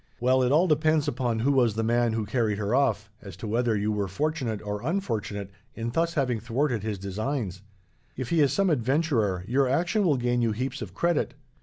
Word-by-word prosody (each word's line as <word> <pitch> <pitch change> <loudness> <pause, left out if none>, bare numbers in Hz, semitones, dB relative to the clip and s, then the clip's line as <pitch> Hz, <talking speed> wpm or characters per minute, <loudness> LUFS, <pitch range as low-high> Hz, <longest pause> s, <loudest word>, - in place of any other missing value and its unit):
Well, 130 +2 +3
it 125 0 +2
all 160 +5 +5
depends 155 -2 +2
upon 120 -5 -1
who 140 +4 +3
was 120 -6 +3
the 115 - 0
man 120 0 +2
who 110 -1 -1
carried 110 -3 0
her 105 +2 -1
off, 110 -7 +1
as 95 -3 -10
to 110 - -6
whether 115 0 +1
you 105 +1 0
were 105 -2 -1
fortunate 130 - -2
or 105 0 -4
unfortunate 110 - -3 0.2
in 115 +1 -3
thus 165 +5 0
having 125 -6 0
thwarted 120 +1 -1
his 105 -1 -3
designs. 100 0 -3 0.6
If 130 -2 -4
he 165 -2 +3
is 140 - +4
some 195 -3 +2
adventurer, 120 - +1
your 130 +2 +2
action 175 - +1
will 155 -7 +3
gain 120 0 0
you 115 -2 +1
heaps 130 +5 -3
of 95 -4 -7
credit. 170 +3 0
120 Hz, 205 wpm, -27 LUFS, 105-145 Hz, 0.6 s, all